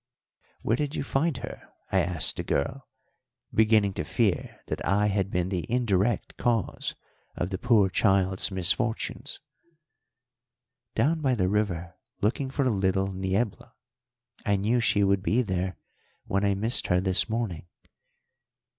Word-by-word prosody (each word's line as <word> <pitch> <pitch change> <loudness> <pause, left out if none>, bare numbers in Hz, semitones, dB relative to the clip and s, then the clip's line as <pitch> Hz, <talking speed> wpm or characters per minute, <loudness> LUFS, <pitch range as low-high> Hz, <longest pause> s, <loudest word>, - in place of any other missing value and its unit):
"Where 115 - +1
did 145 +1 -2
you - - -2
find 140 +1 0
her?" 120 - -7 0.3
I 95 - +3
asked 85 -1 0
the - - -2
girl, 130 - -2 0.7
beginning 110 -2 +4
to - - -3
fear - - -1
that - - -4
I 100 +4 +2
had 100 -1 0
been 90 -1 -1
the 90 -3 -2
indirect 115 -3 0
cause 115 -6 -1 0.4
of 90 +2 -3
the 95 - -3
poor 115 -5 +4
child's 95 -1 +2
misfortunes. 100 +5 0 1.6
"Down 160 +3 +2
by 130 -3 +2
the 95 -5 +1
river 95 -4 -1 0.2
looking 130 +6 0
for 135 0 0
little 95 -3 +1
Niebla. 95 +3 -2 0.7
I 100 - +2
knew 110 +5 +1
she 105 -3 +3
would 100 -1 +2
be 115 +6 +2
there 95 -2 -2 0.5
when 100 +1 0
I 100 -1 +2
missed 110 +5 +2
her 90 -1 +3
this 95 +3 +1
morning." 110 -8 -3
100 Hz, 140 wpm, -27 LUFS, 95-120 Hz, 1.6 s, beginning